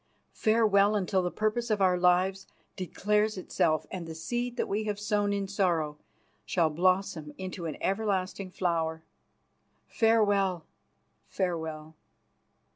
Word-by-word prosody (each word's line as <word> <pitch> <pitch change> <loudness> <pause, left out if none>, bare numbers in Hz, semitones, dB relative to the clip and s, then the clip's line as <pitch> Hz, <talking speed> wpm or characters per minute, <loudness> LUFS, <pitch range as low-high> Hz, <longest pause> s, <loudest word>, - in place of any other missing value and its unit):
Farewell, 215 -2 +3
until 190 -1 +1
the 180 - -1
purpose 215 +5 -1
of 215 -2 +1
our 185 -2 +4
lives 180 +2 +2 0.3
declares 210 +3 0
itself 155 -3 0
and 180 -3 -5
the 160 - -7
seed 240 +8 -3
that - - 0
we 210 +2 -1
have 205 -1 -2
sown 205 -1 0
in 200 -1 -1
sorrow 170 -7 0 0.4
shall 165 -4 +1
blossom 180 -2 0
into 185 -2 -5
an 155 - -5
everlasting 195 -2 -1
flower. 165 -3 -1 0.8
Farewell. 205 -6 +2 0.6
Farewell!" 160 -4 -3
190 Hz, 120 wpm, -29 LUFS, 170-210 Hz, 0.8 s, our